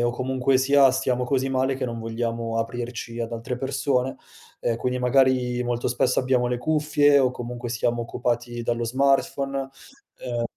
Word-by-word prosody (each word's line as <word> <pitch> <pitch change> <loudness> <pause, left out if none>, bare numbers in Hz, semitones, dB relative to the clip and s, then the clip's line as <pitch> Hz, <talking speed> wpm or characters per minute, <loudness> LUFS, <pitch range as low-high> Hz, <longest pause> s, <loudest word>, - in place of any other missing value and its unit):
ehm, - - +2
o 120 - +2
comunque 130 +1 +1
sia 135 +1 +5
stiamo 125 0 0
così 135 +1 0
male 135 0 0
che 135 - -3
non 115 -2 -4
vogliamo 115 0 -3
aprirci 120 0 -4
ad 115 0 -3
altre 115 +2 -4
persone 135 -1 -1 0.5
e 115 -1 +1
quindi 125 +2 -2
magari 125 -1 +2
molto 120 0 -1
spesso 125 +1 +1
abbiamo 125 -1 +1
le 125 0 0
cuffie 150 0 +3
o 130 -2 +3
comunque 120 0 -6
siamo 120 0 -1
occupati 120 0 -2
dallo 120 0 -1
smartphone, 135 +2 0 0.6
ehm 120 -1 -1
125 Hz, 165 wpm, -24 LUFS, 120-135 Hz, 0.6 s, sia